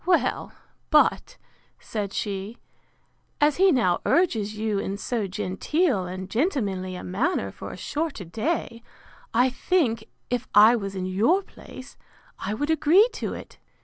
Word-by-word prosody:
Well, 355 -1 +1 0.4
but, - - +3 0.4
said 205 -3 -4
she, 200 +3 -4 0.8
as 295 -1 +3
he 380 +1 +5
now 230 - +2
urges 220 - +1
you 215 -2 -1
in 195 0 -3
so 220 -1 -2
genteel 195 - 0
and 185 +1 -6
gentlemanly 200 - -1
a - - -7
manner 240 - -1
for - - -9
a - - -8
shorter 300 - -3
day, 230 - -3 0.5
I 250 +3 +3
think, 250 -7 0 0.3
if 245 0 -1
I 215 +3 +8
was 200 -3 -4
in 185 -1 -3
your 225 - +2
place, 260 -7 -13 0.4
I 205 +2 -3
would 290 +7 -1
agree 320 - +5
to - - -4
it. - - -11
225 Hz, 145 wpm, -25 LUFS, 195-300 Hz, 0.8 s, I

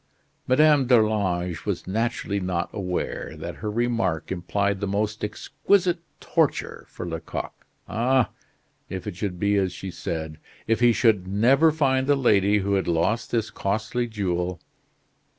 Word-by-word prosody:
Madame 145 0 +5
d'Arlange 100 -8 +2
was - - -3
naturally 105 0 -1
not 90 -2 -2
aware 90 -3 -3
that - - -6
her 105 - -4
remark 115 -8 -1
implied 100 +2 -1
the 100 - -2
most 105 +2 -1
exquisite 180 - +1 0.2
torture - - -1
for - - -7
Lecoq. 80 -1 -5 0.3
Ah! 125 +2 +2 0.6
if 95 -1 -5
it - - -5
should 90 -2 -4
be 100 +1 +2
as 95 -2 +1
she 95 - -7
said, 80 -2 -5 0.3
if 115 0 +1
he 120 0 +6
should 105 -4 +2
never 130 +11 +4
find 135 -4 +1
the 145 - +5
lady 105 -6 +3
who 100 - +1
had 95 -1 +1
lost 85 +8 +1
this 115 -2 -1
costly 110 +4 -1
jewel! 90 -5 -2
105 Hz, 145 wpm, -25 LUFS, 95-120 Hz, 0.6 s, he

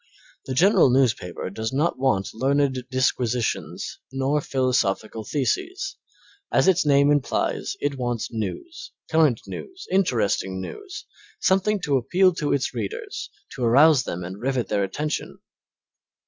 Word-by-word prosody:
The 130 - -3
general 180 - +5
newspaper 120 -9 0
does 110 +3 -3
not 145 +2 0
want 130 -8 +1
learned 135 +1 +1
disquisitions 120 - -1
nor 135 +3 0
philosophical 120 -5 0
theses; 375 - -2 0.6
as - - +3
its 180 -5 +3
name 140 0 +5
implies, 145 -4 0
it 140 -2 -2
wants 120 -2 -2
news, 325 - -6 0.2
current 155 -7 +3
news, 375 -1 -8
interesting 110 - +1
news, 380 - -8 0.3
something 195 +2 +2
to 140 -3 +1
appeal 185 +9 +3
to 150 -3 -2
its 140 - 0
readers, 110 -5 -5 0.2
to 125 - -5
arouse 140 +4 +6
them 90 -7 -5
and 95 +3 -7
rivet 130 -1 -1
their 100 -1 +1
attention. 150 +11 -3
130 Hz, 130 wpm, -24 LUFS, 115-155 Hz, 0.6 s, arouse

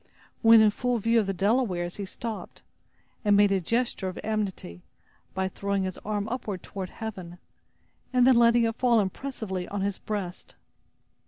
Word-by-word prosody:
When 225 -1 +8
in 215 -1 +5
full 245 +3 -1
view 230 +2 +2
of 210 - 0
the - - +1
Delawares 195 -3 0
he 200 - -4
stopped, 225 +3 -7 0.6
and 205 -2 +4
made 205 -1 +5
a 195 -1 +2
gesture 230 0 -1
of 185 - -5
amity, 200 - -3 0.5
by 190 0 0
throwing 200 0 -2
his 185 -1 -4
arm 210 0 -3
upward 215 -7 -4
toward 190 -2 -6
heaven, 185 -6 -7 0.7
and 250 -1 +4
then 260 -1 +6
letting 235 0 +5
it 225 0 +1
fall 240 -3 +3
impressively 195 -3 -3
on 205 -1 -4
his 200 0 -2
breast. 195 -4 -5
205 Hz, 165 wpm, -27 LUFS, 190-230 Hz, 0.7 s, When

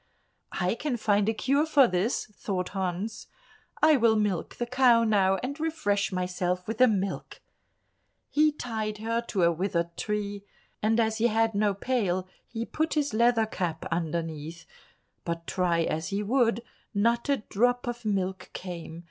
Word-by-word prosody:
"I 180 +1 +1
can 250 +1 -2
find 210 -1 +2
a - - +1
cure 280 +7 +1
for 285 -5 +6
this," 185 +7 0
thought 180 -3 -3
Hans; 190 +3 -3 0.6
"I 310 -2 +7
will 230 -2 +4
milk 205 -5 -1
the 240 - -2
cow 245 -1 +4
now 195 -4 +3
and 280 +4 -4
refresh 310 -13 0
myself 180 0 -2
with 225 0 -4
the 255 - +7
milk." 200 -3 -2 0.9
He 305 +1 +4
tied 220 -6 -4
her 230 +2 -1
to 190 -4 0
a 170 - +5
withered 170 -1 -2
tree, 205 -1 -3 0.4
and 220 +2 +2
as 220 -1 +1
he 235 - +4
had 225 0 +2
no 205 -1 +1
pail 195 -5 -1 0.2
he 230 -1 -4
put 315 +5 -1
his 290 -5 0
leather 230 0 +3
cap 180 -6 -3
underneath; 165 -1 -3 0.6
but 170 -1 -4
try 175 -2 +1
as 160 +2 -2
he 200 +1 -2
would, 235 +1 +2 0.3
not 235 +5 +1
a 280 - +3
drop 245 +4 0
of 240 0 -4
milk 190 -3 -2
came. 170 -3 -7
210 Hz, 160 wpm, -28 LUFS, 185-235 Hz, 0.9 s, I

